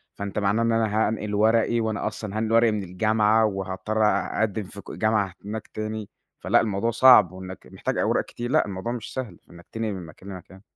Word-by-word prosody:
فأنت 100 0 -4
معناه 100 +2 +1
إن 115 - +2
أنا 110 -1 +1
هانقِل 105 -1 -3
ورقي 110 +2 +3
وأنا 110 -3 -1
أصلًا 110 -1 -5
هانقِل 110 0 -1
ورقي 115 0 +5
من 105 -2 -2
الجامعة 110 +4 +2
وهاضطّر 95 +1 -2
أ 100 -2 0
أقدِّم 110 -1 0
في 100 +1 -10
ك - - -11
جامعة 110 -4 0
هناك 110 +1 -5
تاني، 110 -1 -5 0.3
فلأ - - +3
الموضوع 110 +2 -1
صعب 125 -7 +7
وإنك 95 0 -10
محتاج - - -3
أوراق - - +1
كتير، 120 +1 -6
لأ، 155 - +3
الموضوع 100 +3 -4
مش 120 -3 -6
سهل 130 -4 -5
في - - -23
إنك 85 0 -14
تنقِل 110 -2 -3
من 90 -3 -7
مكان 85 +5 -13
لمكان. 95 0 -11
110 Hz, 205 wpm, -25 LUFS, 95-110 Hz, 0.3 s, صعب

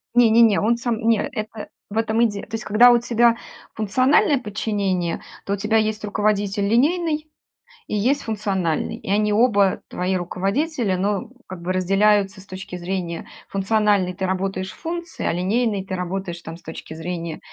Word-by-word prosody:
Не, 245 -2 +6
не, 225 +2 +5
не, 220 -3 +4
он 235 +3 +2
сам 235 -2 -2
не, 225 0 +3
это, 215 -2 -5 0.2
в 210 - -5
этом 225 0 +1
и 235 - +6
де 205 -2 -5
То - - -12
есть, 225 - -3
когда 235 +4 +7
у 240 - +5
тебя 235 0 +3 0.4
функциональное 255 +7 +3
подчинение, 200 -5 -2 0.2
то 200 - -1
у - - +2
тебя 215 +3 +1
есть 215 -1 0
руководитель 205 -1 0
линейный 305 - +1 0.6
и - - -3
есть 255 +8 +1
функциональный, 195 -7 -1
и - - -10
они 210 +1 +2
оба 205 -4 +3
твои 185 +1 -1
руководители. 195 - -1
Но 200 +4 -1 0.2
как 185 -2 -8
бы 185 +2 -1
разделяются 195 +1 +2
с - - -17
точки 185 -1 -8
зрения 175 -1 -4 0.2
функциональной 200 -2 +1
ты 190 +1 -3
работаешь 190 0 -2
в - - -16
функции, 340 0 -5
а - - +1
линейной 200 +3 0
ты 190 - -4
работаешь, 180 -1 -4
там, 165 0 -8
с - - -21
точки 160 0 -9
зрения, 165 0 -5
205 Hz, 180 wpm, -22 LUFS, 190-225 Hz, 0.6 s, когда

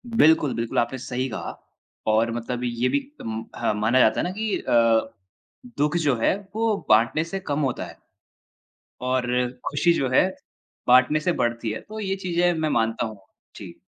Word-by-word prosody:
बिल्कुल, 155 - +4
बिल्कुल। 115 0 -3
आपने 120 +2 -1
सही 130 +1 -3
कहा 110 - -6 0.5
और 110 +2 +3
मतलब 120 +1 -4
ये 120 +1 0
भी - - +2 0.2
अम, 110 0 -5
ह - - 0
माना 110 +5 +2
जाता 110 - +4
है - - +1
ना - - -3
कि 215 +2 -2
अ, 115 -1 +2 0.6
दु:ख 150 +4 +1
जो 140 -4 +3
है - - +3 0.2
वो 225 -1 +1
बाँटने 115 +8 +4
से 195 +4 -5
कम 150 -6 -3
होता - - -4
है। - - -12 1.1
और 130 -1 +1 0.4
खुशी 170 +4 +3
जो 135 -5 0
है 185 - +5 0.6
बाँटने 130 +4 +5
से 175 +4 0
बढ़ती 115 -1 -1
है। 110 - -5
तो 215 +1 -9
ये 195 -2 -1
चीज़ें 175 -2 +1
मैं 155 - 0
मानता 115 -3 0
हूँ। 110 -2 -7 0.4
जी। - - -10
130 Hz, 175 wpm, -24 LUFS, 115-170 Hz, 1.1 s, है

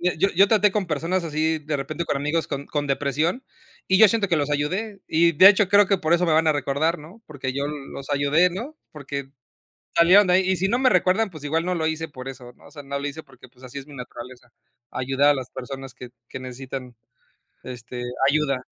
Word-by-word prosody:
yo 180 +1 +1
yo 195 +3 +5
traté 210 -3 +3
con 200 -4 -2
personas 165 +4 -1
así 160 0 -1
de 150 0 -3
repente 155 +5 -4
con 145 - -1
amigos 150 +4 -1
con 140 0 -5
con 145 -1 -3
depresión 150 - -1 0.4
y 190 - +3
yo 220 -2 +8
siento 220 -1 +1
que 175 - +1
los 150 -1 0
ayudé 190 +9 -2
y 170 +2 +3
de 185 +6 +8
hecho, 205 -1 +4
creo 205 0 +5
que 195 -2 +1
por 160 -1 0
eso 175 +1 +3
me 165 - +2
van 160 0 +3
a - - +4
recordar, 145 +4 -1
¿no?, 175 +10 -14
porque 135 -3 -5
yo 140 +2 -2
los 140 -1 -8
ayudé, 145 +5 +3
¿no?, 240 - -7
porque 140 -2 -7 0.7
salieron 185 +4 +6
de 180 - +3
ahí, 185 0 +3
y 190 - +1
si 190 - 0
no 235 - +1
me 260 0 +3
recuerdan, 205 0 +2
pues 155 -5 -11
igual 160 +3 0
no 180 +1 -1
lo 160 -2 -1
hice 160 0 -3
por 130 -2 -9
eso, 125 -2 -9
¿no?, - - -20
o - - -18
sea, 145 -2 -10
no 140 0 -4
lo 145 - -3
hice 155 +3 -7
porque 130 -3 -17
pues 125 +1 -23
así 130 +2 -9
es 140 - -12
mi 145 - -12
naturaleza, 125 0 -10 0.4
ayudar 135 +3 +1
a 145 - +5
las 130 -3 -5
personas 135 0 -8
que 125 -2 -11 0.2
que - - -8
necesitan, 130 -1 -8 0.7
este, 125 0 -7 0.3
ayuda. 140 -3 0
150 Hz, 235 wpm, -23 LUFS, 135-180 Hz, 0.7 s, yo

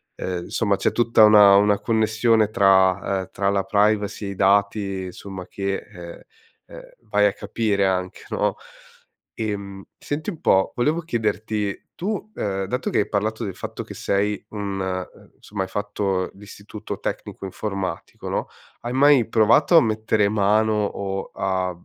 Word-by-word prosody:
ehm, 90 -1 -4
somma, 100 -3 +1
c'è - - +1
tutta 115 -2 +4
una 105 -2 +8
una 105 0 +4
connessione 110 -1 +2
tra, 95 -1 +3
uhm, 95 - -9
tra 100 0 0
la 100 -1 +1
privacy 105 0 +1
e - - -4
i - - -7
dati 100 -1 +1
somma 95 -2 -9
che, 100 0 -3
uhm, 85 -1 -10 0.5
uhm, - - -9 0.3
vai 105 0 +3
a 100 - 0
capire 100 -1 0
anche, 95 -1 -3
no? - - 0 0.8
Ehm, 100 -3 -4
senti 150 +6 -4
un 165 - -11
po', 95 0 +3
volevo 150 +7 +1
chiederti: 110 - -2
tu, 210 +3 -4
ehm, 95 -1 -2
dato 125 +6 -2
che - - +2
hai - - -3
parlato 110 +2 -1
del 95 - -5
fatto - - -6
che - - -10
sei 100 +1 -1
un 95 -3 -3 0.3
somma, 100 -1 -6
hai 95 - -7
fatto 100 -2 -2
l'istituto 105 +1 -9
tecnico - - -5
informatico, 100 0 -5
no, - - -2 0.3
hai 120 - -4
mai 135 -3 +5
provato 120 +10 +5
a - - +8
mettere 110 -1 +1
mano, 110 +1 +2
o 95 -1 -4
a, 95 -1 -1
100 Hz, 155 wpm, -23 LUFS, 95-110 Hz, 0.8 s, una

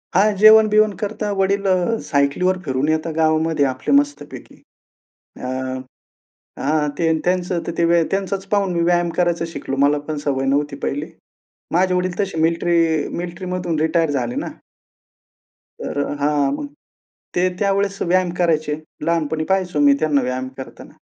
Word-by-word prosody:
हां, 205 +2 +4
जेवण-बिवण 215 0 +6
करतात, 210 +1 -3
वडील 200 +1 +1
अ, 185 +5 +1
सायकलीवर 150 +6 +1
फिरून 135 +2 0
येतात 160 0 -1
गावामध्ये 160 -2 +2
आपले 130 - -1
मस्तपैकी. 290 0 -6 0.8
अ, - - -7 1.2
हां 150 +1 +1
ते 165 -1 +2
त्यांचं 180 -1 0
तर 170 - -3
ते 170 - +3
व्या 170 0 +4
त्यांचाच 195 0 -2
पाहून 200 -3 +2
मी 170 - 0
व्यायाम 175 0 +2
करायचं 170 -2 +1
शिकलो. 135 -4 -5
मला 145 0 +2
पण 155 - -2
सवय 135 -1 0
नव्हती 140 +1 0
पहिले. 145 +2 -2 0.7
माझे 180 +1 +2
वडील 180 0 -1
तसे 195 -5 -2
मिलिट्री 165 -1 +1
मिलिट्रीमधून 175 -1 -3
रिटायर 160 -1 +1
झाले 120 0 -3
ना. - - -4 1.3
तर 145 - -3 0.2
हां 145 -1 +1
मग 285 - -4 0.7
ते 180 +1 +2
त्यावेळेस 200 0 0
व्यायाम 180 0 +2
करायचे. 155 -3 +1 0.3
लहानपणी 160 -2 0
पाहायचो 185 -5 0
मी 145 -1 +6
त्यांना 150 -3 +2
व्यायाम 125 +1 -3
करताना. 130 - -10
170 Hz, 140 wpm, -20 LUFS, 150-185 Hz, 1.3 s, जेवण-बिवण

